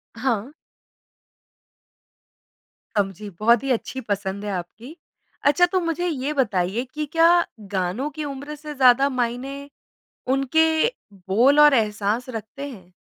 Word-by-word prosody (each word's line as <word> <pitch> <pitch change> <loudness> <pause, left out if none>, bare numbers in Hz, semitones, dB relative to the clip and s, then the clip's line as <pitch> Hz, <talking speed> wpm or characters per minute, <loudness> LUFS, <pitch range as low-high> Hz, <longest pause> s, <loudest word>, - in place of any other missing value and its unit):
हाँ। 235 0 -1 2.5
समझी, 200 +1 -2
बहुत 235 +2 +4
ही 275 - -1
अच्छी 260 +2 -2
पसंद 200 -2 -3
है 205 - -3
आपकी। 210 - -7 0.5
अच्छा, 295 +5 +5
तो 370 +1 0
मुझे 345 0 -2
ये 295 -2 -2
बताइए 205 -4 0
कि 305 0 -3
क्या 335 +1 +5 0.3
गानों 190 +10 -1
की 310 - -6
उम्र 285 +1 -6
से 300 0 -8
ज़्यादा 265 +1 +5
मायने 255 +2 -3 0.7
उनके 275 +4 +3 0.6
बोल 255 +9 +4
और 295 -1 +8
एहसास 215 +1 0
रखते 235 +5 -6
हैं? 185 -8 -13
255 Hz, 125 wpm, -23 LUFS, 210-290 Hz, 2.5 s, और